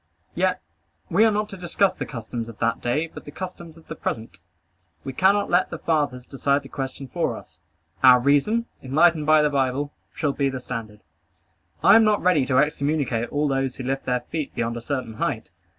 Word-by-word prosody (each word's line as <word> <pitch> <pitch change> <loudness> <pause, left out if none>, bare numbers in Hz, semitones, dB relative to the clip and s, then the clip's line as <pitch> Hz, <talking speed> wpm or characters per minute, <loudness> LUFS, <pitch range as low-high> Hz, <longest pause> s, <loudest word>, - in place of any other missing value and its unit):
Yet - - 0 0.5
we 220 - +5
are - - +5
not 210 0 -1
to 195 - -8
discuss 185 +2 +1
the - - -6
customs 115 0 -6
of 115 - -11
that 115 0 0
day, 135 +7 0
but - - -10
the 145 - -9
customs 170 -2 -8
of 165 - -17
the - - -5
present. 110 -3 -5 0.6
We 135 - -5
cannot 200 +7 +3
let 175 +1 +3
the - - -5
fathers 145 -6 -1
decide 140 +1 0
the 135 - -12
question 135 0 -5
for - - -2
us. - - -15 0.4
Our 125 -1 +8
reason, 145 - +2 0.2
enlightened 155 +3 +3
by 155 -1 +6
the 150 - +2
Bible, 140 +1 0 0.2
shall 145 -2 0
be 140 -1 0
the 130 -1 -4
standard. 110 -4 -7 0.8
I - - +8
am 225 - +7
not 215 -1 +3
ready 165 -8 +3
to 130 -2 +2
excommunicate 140 -5 0
all 150 +1 0
those 135 -1 -1
who 130 - -7
lift 135 +2 -2
their 125 -1 0
feet 155 +3 -5
beyond 115 0 -1
a 120 - -5
certain 130 -2 -3
height. - - -2
140 Hz, 200 wpm, -24 LUFS, 125-165 Hz, 0.8 s, Our